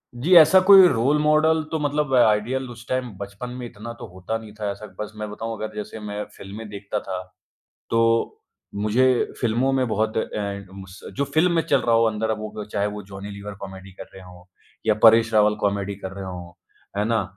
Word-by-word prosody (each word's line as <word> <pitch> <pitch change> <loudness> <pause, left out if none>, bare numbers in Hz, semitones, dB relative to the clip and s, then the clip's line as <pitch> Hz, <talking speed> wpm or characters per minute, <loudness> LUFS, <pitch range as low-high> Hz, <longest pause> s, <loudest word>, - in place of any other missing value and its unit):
जी, 145 +10 +1
ऐसा 170 +3 +8
कोई 195 -2 +10
role 135 +1 +2
model 155 +1 +3
तो 160 - -1
मतलब 145 -1 -1
आइडियल 120 +3 +2
उस 120 0 -12
टाइम 130 -1 -1
बचपन 100 +5 -7
में 125 - -6
इतना 115 0 -8
तो - - -7
होता 95 +5 -4
नहीं 110 -2 -12
था 105 -1 -2
ऐसा, 105 - -9
बस 105 - -5
मैं 105 0 -5
बताऊँ 115 +2 -5
अगर 110 0 -6
जैसे 105 +1 -6
मैं 105 0 -5
फ़िल्में 105 +3 -9
देखता 100 +1 -4
था, 95 -2 -5 0.7
तो 115 0 +2 0.4
मुझे 110 +5 +2 0.3
फ़िल्मों 120 +3 +1
में 130 -1 +1
बहुत 110 0 -1
अ, - - +3
इन 100 -2 -5
उस 95 0 -13 0.2
जो 140 - +1
फ़िल्म 170 +3 +3
में 170 -1 +2
चल - - +3
रहा 115 -1 +2
हो 115 - +4
अंदर 110 0 -2
अब 110 -1 -1
वो 105 -1 -6
चाहे 100 0 0
वो 105 0 -6
जॉनी 100 +1 -9
लीवर 100 +1 -8
कॉमेडी 95 0 -9
कर 95 - -10
रहे 95 - -12
हों 90 -1 -14 0.4
या 110 - +4
परेश 115 0 +6
रावल 105 0 +4
कॉमेडी 100 0 -1
कर 95 -1 -7
रहे 100 0 -7
हों। 90 -2 -8 0.5
है 105 - +1
ना? 115 -2 +1
110 Hz, 210 wpm, -23 LUFS, 100-120 Hz, 0.7 s, कोई